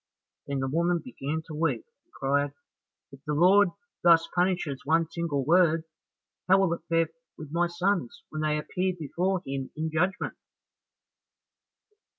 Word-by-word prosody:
Then 140 Hz, -1 st, -2 dB
the 130 Hz, -, -1 dB
woman 170 Hz, +5 st, +1 dB
began 160 Hz, -, -4 dB
to 160 Hz, -, -9 dB
weep 160 Hz, +2 st, -1 dB, 0.2 s
and 345 Hz, -, -43 dB
cried, 145 Hz, +1 st, 0 dB, 0.6 s
"If 135 Hz, -, -13 dB
the 150 Hz, -, 0 dB
Lord 190 Hz, +5 st, +6 dB, 0.3 s
thus 165 Hz, -1 st, +6 dB
punishes 175 Hz, -6 st, 0 dB
one 165 Hz, +2 st, +2 dB
single 165 Hz, -6 st, -2 dB
word, 165 Hz, -1 st, +4 dB, 0.6 s
how 190 Hz, +1 st, +6 dB
will 190 Hz, -3 st, +2 dB
it 170 Hz, -, -5 dB
fare 165 Hz, -1 st, +2 dB, 0.3 s
with 155 Hz, -2 st, -9 dB
my 175 Hz, +2 st, +2 dB
sons 175 Hz, -5 st, -1 dB
when 155 Hz, -, -4 dB
they 155 Hz, 0 st, +1 dB
appear 180 Hz, +5 st, -1 dB
before 175 Hz, +5 st, -1 dB
him 135 Hz, -1 st, -4 dB
in 160 Hz, +1 st, -2 dB
judgment?" 180 Hz, +5 st, 0 dB
165 Hz, 150 wpm, -28 LUFS, 150-180 Hz, 0.6 s, Lord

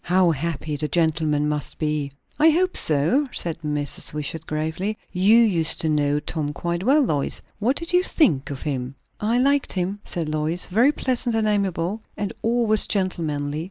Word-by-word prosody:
"How 180 Hz, -1 st, +3 dB
happy 155 Hz, -1 st, -3 dB
the 150 Hz, +1 st, -2 dB
gentleman 155 Hz, -3 st, +1 dB
must 150 Hz, -1 st, -3 dB
be!" 150 Hz, -2 st, -1 dB, 0.3 s
"I 315 Hz, +2 st, +6 dB
hope 360 Hz, +4 st, +1 dB
so," 165 Hz, -, +1 dB
said 165 Hz, -2 st, -2 dB
Mrs. 150 Hz, -2 st, +1 dB
Wishart 150 Hz, +2 st, -4 dB
gravely. 160 Hz, +7 st, -2 dB
"You 195 Hz, +5 st, +4 dB
used 185 Hz, -9 st, +2 dB
to 160 Hz, -, 0 dB
know 145 Hz, -1 st, +1 dB
Tom 150 Hz, 0 st, -3 dB
quite 170 Hz, +4 st, -3 dB
well, 275 Hz, +9 st, +4 dB
Lois. 145 Hz, -, 0 dB, 0.2 s
What 240 Hz, +6 st, +1 dB
did 335 Hz, +3 st, -4 dB
you 360 Hz, -, +5 dB
think 250 Hz, -, +2 dB
of 140 Hz, -2 st, -6 dB
him?" 130 Hz, -3 st, -3 dB, 0.2 s
"I 225 Hz, +3 st, +1 dB
liked 280 Hz, +2 st, +2 dB
him," 190 Hz, +2 st, -2 dB
said 165 Hz, -3 st, -4 dB
Lois. 155 Hz, +3 st, 0 dB
"Very 235 Hz, +9 st, +3 dB
pleasant 250 Hz, -4 st, -1 dB
and 220 Hz, -1 st, +1 dB
amiable, 200 Hz, -1 st, -1 dB, 0.2 s
and 205 Hz, +1 st, -3 dB
always 225 Hz, -2 st, +2 dB
gentlemanly. 155 Hz, -7 st, -1 dB
170 Hz, 170 wpm, -23 LUFS, 150-220 Hz, 0.3 s, I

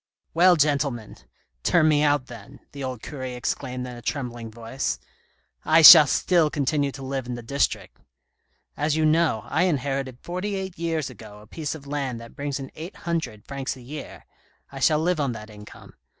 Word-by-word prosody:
" -, -, -52 dB
Well, 180 Hz, +2 st, +6 dB
gentlemen, 140 Hz, -7 st, 0 dB, 0.5 s
turn 160 Hz, -, +3 dB
me 150 Hz, -1 st, +3 dB
out 145 Hz, -3 st, +2 dB
then," 115 Hz, -5 st, -12 dB
the 140 Hz, -1 st, -7 dB
old 130 Hz, -3 st, -5 dB
cure 145 Hz, -3 st, -7 dB
exclaimed 125 Hz, 0 st, -4 dB
in 125 Hz, -1 st, -8 dB
a 120 Hz, -, -10 dB
trembling 120 Hz, -3 st, -4 dB
voice; 115 Hz, -, -4 dB, 0.3 s
" -, -, -41 dB, 0.2 s
I 160 Hz, +1 st, +4 dB
shall 155 Hz, -2 st, +12 dB
still 170 Hz, +2 st, +2 dB
continue 145 Hz, 0 st, 0 dB
to 135 Hz, -, -9 dB
live 135 Hz, -1 st, -4 dB
in 125 Hz, -, -4 dB
the 120 Hz, -, -8 dB
district. 140 Hz, +4 st, -1 dB, 0.8 s
As 150 Hz, +1 st, 0 dB
you 155 Hz, 0 st, +2 dB
know, 155 Hz, -8 st, +2 dB
I 160 Hz, +8 st, +1 dB
inherited 135 Hz, -5 st, -2 dB
forty 185 Hz, +6 st, -4 dB
eight 190 Hz, -2 st, -5 dB
years 160 Hz, -5 st, -2 dB
ago 105 Hz, -3 st, -12 dB
a 105 Hz, -, -15 dB
piece 155 Hz, +7 st, -5 dB
of 145 Hz, -3 st, -12 dB
land 140 Hz, -4 st, -3 dB
that 115 Hz, 0 st, -12 dB
brings 140 Hz, 0 st, -3 dB
in 135 Hz, -1 st, -8 dB
eight 165 Hz, +5 st, -9 dB
hundred 145 Hz, -12 st, -3 dB
francs 135 Hz, -1 st, -4 dB
a -, -, -13 dB
year; 145 Hz, +4 st, -9 dB, 0.5 s
I 135 Hz, -, -8 dB
shall 150 Hz, +4 st, +3 dB
live 170 Hz, +1 st, 0 dB
on 140 Hz, -4 st, 0 dB
that 110 Hz, -1 st, -10 dB
income. 105 Hz, 0 st, -13 dB
140 Hz, 195 wpm, -24 LUFS, 125-155 Hz, 0.8 s, shall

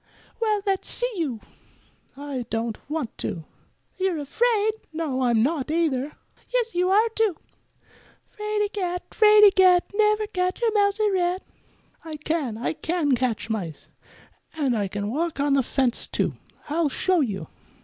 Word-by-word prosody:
"Well, 425 Hz, -2 st, +1 dB
let's 390 Hz, -2 st, -1 dB
see -, -, -1 dB
you." 275 Hz, -, -2 dB, 0.8 s
"I 275 Hz, -4 st, -5 dB
don't 225 Hz, 0 st, -2 dB
want 300 Hz, -7 st, -3 dB
to." 165 Hz, -, -3 dB, 0.6 s
"You're 375 Hz, -3 st, +1 dB
afraid." 440 Hz, -, +1 dB, 0.2 s
"No, 310 Hz, -5 st, -2 dB
I'm 235 Hz, -3 st, +3 dB
not, 295 Hz, 0 st, -1 dB
either." 300 Hz, -4 st, 0 dB, 0.4 s
"Yes, 485 Hz, -2 st, 0 dB
you 360 Hz, +1 st, +1 dB
are, 425 Hz, +4 st, +4 dB
too." 440 Hz, -5 st, 0 dB, 0.9 s
"Fraidy 420 Hz, -1 st, -1 dB
cat! 360 Hz, -3 st, -2 dB
Fraidy 420 Hz, -1 st, +7 dB
cat! 365 Hz, -2 st, +5 dB
Never 425 Hz, 0 st, +3 dB
catch 365 Hz, -2 st, -2 dB
a 460 Hz, -, +3 dB
mouse 405 Hz, 0 st, +2 dB
or 425 Hz, -1 st, +2 dB
rat." 365 Hz, 0 st, 0 dB, 0.6 s
"I 320 Hz, -1 st, -6 dB
can; 300 Hz, -6 st, -2 dB
I 240 Hz, -, -2 dB
can 325 Hz, -2 st, -1 dB
catch 245 Hz, -3 st, -1 dB
mice. 180 Hz, -8 st, -5 dB, 0.7 s
And 275 Hz, -6 st, +1 dB
I 205 Hz, -3 st, 0 dB
can 205 Hz, +2 st, -4 dB
walk 325 Hz, +3 st, -2 dB
on 285 Hz, 0 st, +2 dB
the 275 Hz, -, +4 dB
fence, 255 Hz, -1 st, 0 dB
too. -, -, -1 dB, 0.3 s
I'll 315 Hz, +1 st, +1 dB
show 365 Hz, +5 st, +1 dB
you." 200 Hz, -, -2 dB
330 Hz, 150 wpm, -24 LUFS, 260-405 Hz, 0.9 s, Fraidy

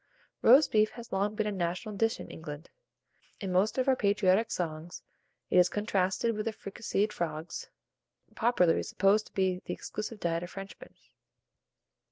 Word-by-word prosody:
ROAST 265 Hz, +7 st, +7 dB
BEEF 215 Hz, 0 st, +4 dB
has 235 Hz, -1 st, -10 dB
long 200 Hz, +2 st, 0 dB
been 215 Hz, -, 0 dB
a 210 Hz, -, -1 dB
national 180 Hz, +2 st, -3 dB
dish 225 Hz, +2 st, +1 dB
in -, -, -7 dB
England. 155 Hz, -1 st, -9 dB, 0.7 s
In 195 Hz, -2 st, -4 dB
most 190 Hz, +7 st, +2 dB
of 260 Hz, +1 st, +1 dB
our 265 Hz, -, +5 dB
patriotic 205 Hz, 0 st, +2 dB
songs 165 Hz, 0 st, -4 dB, 0.5 s
it -, -, +4 dB
is 180 Hz, 0 st, +5 dB
contrasted 205 Hz, +1 st, 0 dB
with 215 Hz, -, -3 dB
the -, -, +1 dB
fricasseed 210 Hz, 0 st, -2 dB
frogs, 160 Hz, -1 st, -4 dB, 0.6 s
popularly 220 Hz, -8 st, +3 dB
supposed 200 Hz, +3 st, +2 dB
to -, -, -21 dB
be 185 Hz, -1 st, 0 dB
the -, -, -3 dB
exclusive 215 Hz, 0 st, -6 dB
diet 170 Hz, -2 st, -1 dB
of 175 Hz, -, -6 dB
Frenchmen. 195 Hz, +1 st, -10 dB
195 Hz, 160 wpm, -30 LUFS, 180-215 Hz, 0.7 s, ROAST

